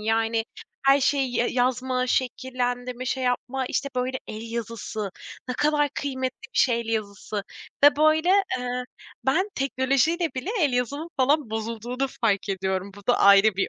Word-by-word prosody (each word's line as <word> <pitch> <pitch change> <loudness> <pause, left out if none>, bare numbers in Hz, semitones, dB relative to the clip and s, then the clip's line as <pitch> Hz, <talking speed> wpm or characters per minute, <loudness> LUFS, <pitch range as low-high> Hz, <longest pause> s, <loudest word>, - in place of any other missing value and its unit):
yani 225 +1 +1 0.4
her 275 +1 +6
şey 275 -1 +2
ye 240 - +1
yazma, 255 0 0
şekillendirme, 250 -1 -2
şey 260 0 -1
yapma, 250 +1 -1
işte, 280 - -1
böyle 255 +1 -1
el 225 +1 -7
yazısı, 225 -3 -4 0.4
ne 250 - -2
kadar 295 +1 +2
kıymetli 260 -2 -3
bir - - 0
şey 235 -3 +3
el 230 - -7
yazısı 210 -2 -3 0.4
ve 290 0 +7
böyle, 310 +2 +3 0.3
eee, 250 0 -3 0.4
ben 365 +10 +2
teknolojiyle 275 +5 +1
bile 260 +10 -3
el 290 -5 +3
yazımın 280 +7 -1
falan 275 -1 +2
bozulduğunu 230 +4 -3
fark 205 -3 +1
ediyorum. 190 0 -2
Bu 205 - -14
da 245 - +3
ayrı 200 +1 +6
bir 195 - +1
250 Hz, 155 wpm, -25 LUFS, 225-270 Hz, 0.4 s, ve